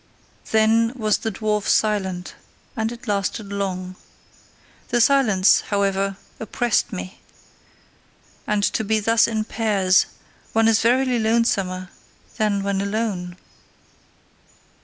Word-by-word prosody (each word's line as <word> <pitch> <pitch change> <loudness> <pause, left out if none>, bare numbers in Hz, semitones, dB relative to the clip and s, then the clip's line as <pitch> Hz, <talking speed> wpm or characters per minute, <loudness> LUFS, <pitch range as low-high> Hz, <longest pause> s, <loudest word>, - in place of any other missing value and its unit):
Then 225 +2 +3
was 215 -4 0
the 225 - -3
dwarf 210 0 -2
silent; 190 -4 0 0.4
and 220 -1 -2
it 240 +1 -11
lasted 200 0 -2
long. 185 -2 -4 0.9
The 240 - 0
silence, 225 -7 +4
however, 195 -1 0 0.2
oppressed 230 +1 0
me; 90 0 -7 1.3
and 210 -1 0
to 220 - 0
be 220 +1 +1
thus 225 +2 +3
in 220 -2 -1
pairs, 200 -5 +2 0.5
one 225 0 +3
is 225 -1 +3
verily 250 +1 +2
lonesomer 200 -5 0 0.5
than 205 -2 0
when 200 -1 -1
alone! 200 -4 -3
210 Hz, 110 wpm, -22 LUFS, 195-225 Hz, 1.3 s, silence